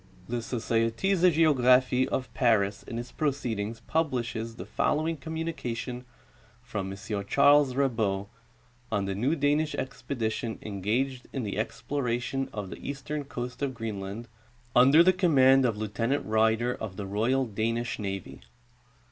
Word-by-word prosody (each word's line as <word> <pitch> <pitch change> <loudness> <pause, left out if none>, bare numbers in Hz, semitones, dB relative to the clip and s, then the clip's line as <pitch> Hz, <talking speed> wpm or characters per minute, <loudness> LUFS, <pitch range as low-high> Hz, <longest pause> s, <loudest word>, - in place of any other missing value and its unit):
— 90 0 -24
The 120 - 0
Societe 115 - 0
de 180 0 +5
Geograpliie 130 -5 +4
of 130 -1 -3
Paris 105 -5 +2
in 115 - -7
its 120 +1 -6
Pro 155 - +1
ceedings 115 -5 -4
publishes 120 -7 -1
the - - -7
following 160 +2 0
communication 135 -6 -4 0.6
from 105 -6 -4
M. 100 - -7
Ch. 100 +2 -4
Rabot 130 -8 +3 0.6
on 100 -3 0
the 95 - -2
new 125 +11 +1
Danish 150 +1 +1
expedition 115 -4 -3
eiigaged 115 +6 -1
in 135 - -3
the 105 0 -3
exploration 125 +3 -2
of 100 -3 -5
the - - -6
eastern 140 +1 -5
coast 125 -1 -6
'of 135 -2 -1
Greenland, 110 0 -5 0.5
under 135 +7 +7
the 185 +1 +5
command 135 -8 +5
of 115 -4 0
Lieu 110 0 -2
tenant 115 +7 -1
Ryder, 110 +2 +2
of 105 -6 -6
the 100 - -5
royal 115 +7 +1
Danish 115 +2 -2
navy. 95 -3 -5
120 Hz, 145 wpm, -28 LUFS, 110-140 Hz, 0.6 s, under